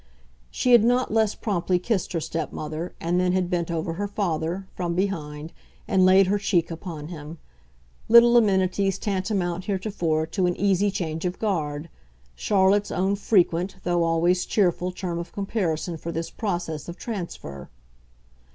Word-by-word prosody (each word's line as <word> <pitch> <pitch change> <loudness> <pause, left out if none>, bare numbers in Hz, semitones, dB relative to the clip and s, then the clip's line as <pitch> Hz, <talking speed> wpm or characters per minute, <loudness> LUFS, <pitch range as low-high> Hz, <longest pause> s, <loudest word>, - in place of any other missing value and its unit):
She 250 - 0
had 240 -3 +7
not 245 0 +2
less 220 -2 +2
promptly 185 -4 0
kissed 190 +1 -1
her 165 - 0
stepmother, 160 +1 -4
and 175 +2 0
then 180 0 +2
had 185 -1 0
bent 175 -1 -1
over 165 0 -2
her 205 +4 -3
father, 180 -2 -2
from 175 -2 -2
behind, 160 -5 -3 0.3
and 190 -4 +3
laid 190 +1 +6
her 200 +2 +1
cheek 175 -5 +1
upon 165 -2 -7
him; 160 -1 -8 0.7
little 235 +1 +8
amenities 195 -3 +2
tantamount 185 -3 -2
heretofore 185 -6 -1
to 180 +2 0
an 175 - 0
easy 200 0 +2
change 165 -5 -3
of 180 0 -2
guard 155 -7 -2 0.5
Charlotte's 200 - +2
own 190 +2 0
frequent, 190 -2 +1
though 175 -1 +1
always 170 +2 +2
cheerful, 180 -3 +1
term 180 -2 -4
of 170 0 -7
comparison 180 -5 -2
for 170 +2 -5
this 165 0 -4
process 175 - -3
of 170 - -7
transfer. 170 - -6
180 Hz, 150 wpm, -25 LUFS, 165-200 Hz, 0.7 s, little